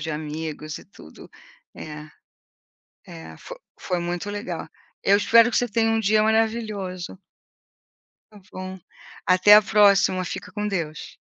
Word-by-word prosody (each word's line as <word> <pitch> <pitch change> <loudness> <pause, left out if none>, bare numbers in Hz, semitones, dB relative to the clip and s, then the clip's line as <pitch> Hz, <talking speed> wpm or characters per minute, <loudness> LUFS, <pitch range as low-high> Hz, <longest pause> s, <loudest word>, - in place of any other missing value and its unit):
de 160 +1 -4
amigos 155 0 -6
e - - -15
tudo. 200 - -15 0.5
É, 150 0 -9 1.0
é, 80 -1 -11
foi - - -11 0.2
foi 180 -1 -2
muito 175 +3 -4
legal. 205 +4 -6 0.3
Eu 200 - +4
espero 230 +3 +5
que - - -1
você 245 - +1
tenha 225 +1 +1
um 225 - +1
dia 215 0 +2
maravilhoso. 215 -5 -1 1.1
Está 210 - -15
bom. 185 0 -7 0.5
Até 185 +3 +7
a 210 - +8
próxima. 200 -3 +3
Fica - - -7
com 210 -1 -3
Deus. 165 -6 -5
195 Hz, 140 wpm, -23 LUFS, 165-215 Hz, 1.1 s, a